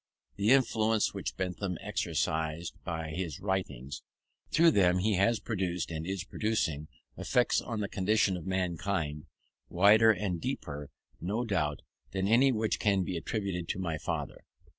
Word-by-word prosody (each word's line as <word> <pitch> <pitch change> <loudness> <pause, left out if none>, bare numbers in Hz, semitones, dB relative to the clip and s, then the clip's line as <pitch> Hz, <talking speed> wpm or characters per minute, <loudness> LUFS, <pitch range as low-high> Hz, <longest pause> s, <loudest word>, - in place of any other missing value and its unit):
The 100 +2 +1
influence 115 -4 +3
which - - -4
Bentham 90 -1 -2
exercised 80 +1 -2
was - - -27
by 80 -2 -4
his 85 +1 -4
writings. 90 -9 -3 0.5
Through 165 +2 +5
them 90 - +4
he 105 +4 +1
has 110 +4 +3
produced, 90 -6 -2
and 80 +1 -4
is 95 -1 -2
producing, 90 -8 -1 0.3
effects 125 -1 +2
on 115 -3 -4
the 100 - -1
condition 100 0 +2
of 90 0 -7
mankind, 90 -4 -2 0.4
wider 105 +5 +6
and 95 -4 -2
deeper, 75 - -4 0.3
no 105 +8 -2
doubt, 75 -9 -1 0.3
than 95 0 0
any 125 +5 +5
which 110 -2 0
can 100 -3 +2
be 90 - -3
attributed 90 -1 -3
to - - -1
my 85 -4 -2
father. - - -4
95 Hz, 150 wpm, -30 LUFS, 85-110 Hz, 0.5 s, wider